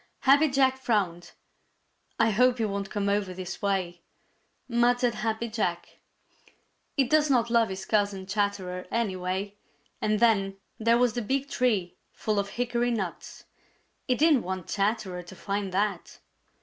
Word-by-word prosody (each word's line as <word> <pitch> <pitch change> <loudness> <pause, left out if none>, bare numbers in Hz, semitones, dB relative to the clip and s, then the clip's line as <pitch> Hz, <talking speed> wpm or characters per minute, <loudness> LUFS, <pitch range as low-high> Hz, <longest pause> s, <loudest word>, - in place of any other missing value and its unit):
Happy 285 +3 +5
Jack 265 -1 +2
frowned. 185 -8 -1 0.9
"I 225 - +4
hope 250 +4 +3
he 225 - 0
won't 200 -1 -3
come 205 -1 -2
over 200 -2 0
this 185 0 -6
way," 185 -4 -1 0.7
muttered 245 0 +2
Happy 225 +1 -2
Jack. 210 -6 -3 1.0
He 275 - +5
does 300 +3 +3
not 235 -3 +2
love 230 -2 +3
his 190 0 -6
cousin 200 -3 0
Chatterer 195 -2 -2
anyway, 195 -2 -2 0.4
and 215 0 +1
then 195 -4 +2 0.2
there 230 +1 +4
was 245 -2 +2
the 245 - -2
big 270 +5 -1
tree 210 -9 0 0.2
full 215 -2 -1
of 200 0 -2
hickory 240 0 -1
nuts! 195 -8 -4 0.6
He 250 - +3
didn't 300 -2 +4
want 185 -2 -5
Chatterer 200 -3 -1
to 175 +2 -12
find 200 0 -3
that. 195 -1 -2
210 Hz, 145 wpm, -27 LUFS, 190-240 Hz, 1.0 s, Happy